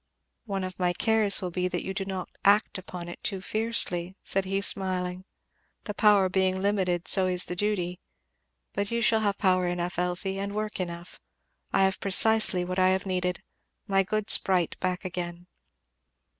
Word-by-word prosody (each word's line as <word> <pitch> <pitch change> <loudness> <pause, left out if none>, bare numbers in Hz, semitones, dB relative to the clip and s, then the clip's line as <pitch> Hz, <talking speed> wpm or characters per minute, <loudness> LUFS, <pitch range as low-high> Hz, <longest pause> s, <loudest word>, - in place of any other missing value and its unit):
"One 195 -3 -3
of 185 0 -7
my 180 -1 +1
cares 215 0 +2
will 180 - -3
be 180 +1 -1
that 180 -1 -3
you 190 - -4
do 195 0 -3
not 190 -1 -5 0.2
act 205 0 +3
upon 180 -1 -8
it 175 - -9
too 195 -3 -1
fiercely," 190 -4 -1
said 195 0 -1
he 195 +1 -1
smiling. 185 -2 +1 0.6
"The 210 - -5
power 205 -2 +4
being 190 0 0
limited 190 -3 0
so 190 -2 +5
is 180 -1 +2
the 180 - -5
duty. 180 -3 -2 0.7
But 200 0 -2
you 235 0 -1
shall 220 0 +4
have 205 -2 0
power 185 -2 +2
enough, 175 +1 -3
Elfie, 180 +2 -2
and 200 +1 -4
work 215 -1 -3
enough. 175 -1 -6 0.5
I - - +3
have 190 0 +1
precisely 200 -2 +4
what 185 +1 -3
I 185 0 +4
have 190 +1 0
needed 180 -1 -2 0.4
my 195 -2 +2
good 215 +2 +1
sprite 180 -3 +3
back 185 0 -2
again." 175 -1 -5
190 Hz, 175 wpm, -27 LUFS, 180-200 Hz, 0.7 s, so